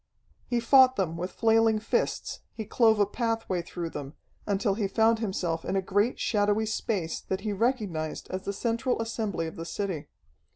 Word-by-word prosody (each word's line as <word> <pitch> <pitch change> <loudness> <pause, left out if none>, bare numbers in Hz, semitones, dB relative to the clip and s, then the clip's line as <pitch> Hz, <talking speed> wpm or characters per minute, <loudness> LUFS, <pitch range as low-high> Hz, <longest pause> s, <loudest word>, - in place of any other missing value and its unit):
He 240 - +1
fought 260 +2 +6
them 175 -6 -1
with 180 +2 -3
flailing 225 -1 +3
fists, 215 - -1 0.2
he 220 - -5
clove 220 0 +3
a 205 - +5
pathway 225 -4 -1
through 170 -1 -5
them, 140 +1 -7 0.3
until 200 0 +1
he 205 0 -1
found 225 +2 +3
himself 180 -6 -2
in - - -2
a 195 - +2
great 205 +6 +1
shadowy 210 0 +2
space 205 -6 -2
that 190 0 -4
he 210 0 -2
recognized 200 - -1
as 185 - -3
the - - -1
central 235 +4 -1
assembly 220 -6 -2
of 160 +4 -7
the 165 - -4
city. 175 -2 -3
205 Hz, 175 wpm, -28 LUFS, 185-225 Hz, 0.3 s, fought